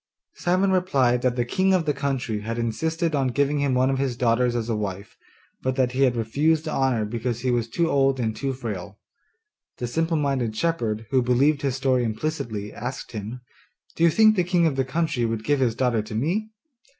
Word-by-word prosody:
Simon 185 +2 +1
replied 135 -10 +2
that 125 -1 +1
the 120 -1 0
king 190 +9 +2
of 175 -3 0
the 150 - +1
country 135 -6 -2
had 115 +3 -4
insisted 160 +8 -1
on 135 -3 +1
giving 140 +3 +1
him 140 -2 +1
one 130 +1 +3
of 135 - -1
his 130 -3 -1
daughters 120 0 +2
as 115 -2 -2
a 115 - 0
wife, 100 -1 -5 0.5
but 130 0 -1
that 130 -2 +1
he 130 +2 -2
had 130 -3 +4
refused 150 +8 +1
the 155 - -3
honour 130 -6 +1
because 115 +2 -3
he 130 0 0
was 120 -2 0
too 170 +8 0
old 135 -3 +2
and 110 -2 -1
too 135 -1 -2
frail. 105 -6 -6 0.8
The 125 - -3
simple 165 +6 0
minded 135 -6 -1
shepherd, 115 -8 -1
who 130 -1 +4
believed 135 +4 +2
his 135 -3 -1
story 130 -2 +1
implicitly, 110 -3 -3
asked 125 +2 -6
him, 110 +3 -6 0.5
'Do 165 - 0
you 170 - +7
think 215 +5 +5
the 180 - +2
king 175 -1 +2
of 155 -4 +1
the 135 - +1
country 150 -2 -1
would 115 -1 -1
give 145 +3 +1
his 120 -4 +1
daughter 125 -3 +1
to 110 +1 -8
me? 180 - -1
130 Hz, 210 wpm, -24 LUFS, 115-150 Hz, 0.8 s, you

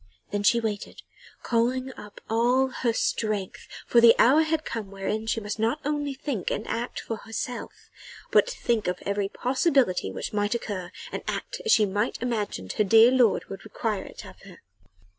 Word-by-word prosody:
Then 205 0 -1
she 205 +4 +4
waited, 215 -3 -4 0.4
calling 255 +2 0
up 210 -1 -12
all 245 +4 +2
her 245 -2 -1
strength 215 -3 -2 0.2
for 235 - +4
the 230 -1 +8
hour 275 +7 +6
had 315 0 0
come 215 -4 -5
wherein 200 +3 -3
she 225 - 0
must 210 0 -5
not 230 +7 +1
only 290 -1 -1
think 265 -8 -3
and 215 - -3
act 240 +2 -3
for 225 - -5
herself, 225 +3 -6 0.4
but - - +4
think 235 - -1
of 180 0 -1
every 200 0 -1
possibility 255 - +1
which - - -5
might 205 +2 0
occur, 185 -6 -4 0.2
and - - -4
act - - -4
as 450 - +2
she 220 - +5
imagined 205 - -2
her - - +6
dear 225 +4 +7
lord 250 -5 +3
would 195 - -8
require 215 -4 -3
it - - -10
of - - -13
her. 190 -3 -15
225 Hz, 175 wpm, -26 LUFS, 205-250 Hz, 0.4 s, the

